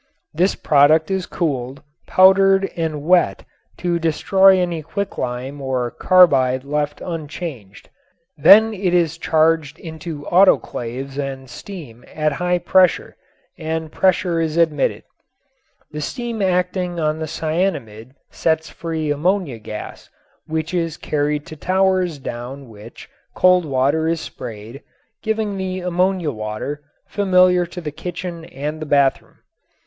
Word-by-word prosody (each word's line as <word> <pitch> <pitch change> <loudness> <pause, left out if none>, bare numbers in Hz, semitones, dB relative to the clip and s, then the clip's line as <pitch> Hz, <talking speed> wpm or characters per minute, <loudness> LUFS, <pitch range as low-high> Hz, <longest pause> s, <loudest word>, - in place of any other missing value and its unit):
This 180 +5 +1
product 155 +4 +3
is 190 -2 -1
cooled, 135 -4 -3 0.2
powdered 195 +1 +5
and 160 -3 -3
wet 180 +2 +2 0.3
to 175 -1 -1
destroy 190 +4 +4
any 175 -3 -1
quicklime 140 -6 -4
or 130 -3 -2
carbide 135 -9 +4
left 145 +1 -2
unchanged. 150 - -7 0.5
Then 220 +8 +7
it 185 -3 0
is 165 -2 +1
charged 160 -2 +1
into 160 -2 -8
autoclaves 135 -7 +1
and 135 -1 -5
steam 125 - -10
at 155 0 0
high 180 +4 0
temperature 180 +1 +2 0.4
and 160 0 -4
pressure 185 -2 +1
is 160 0 -2
admitted. 160 -3 +1 0.9
The 150 - -5
steam 235 - -4
acting 180 -1 0
on 155 0 0
the 160 - -4
cyanamid 145 - -3 0.2
sets 160 -1 -1
free 160 -2 -3
ammonia 155 - -1
gas 105 0 -8 0.4
which 160 +2 -3
is 165 -3 -1
carried 150 0 -2
to 160 - -10
towers 185 0 +1
down 130 +1 -7
which 110 +1 -13 0.3
cold 180 -1 +4
water 140 +3 +1
is 165 0 0
sprayed, 115 -2 -9 0.4
giving 220 -2 -2
the 185 -1 -3
ammonia 180 -2 0
water, 110 +6 -5 0.2
familiar 185 -3 +3
to 180 - -8
the 150 -3 -5
kitchen 170 +1 -6
and 150 +3 -5
the 155 - -5
bathroom. 140 -2 +1
160 Hz, 125 wpm, -20 LUFS, 140-180 Hz, 0.9 s, Then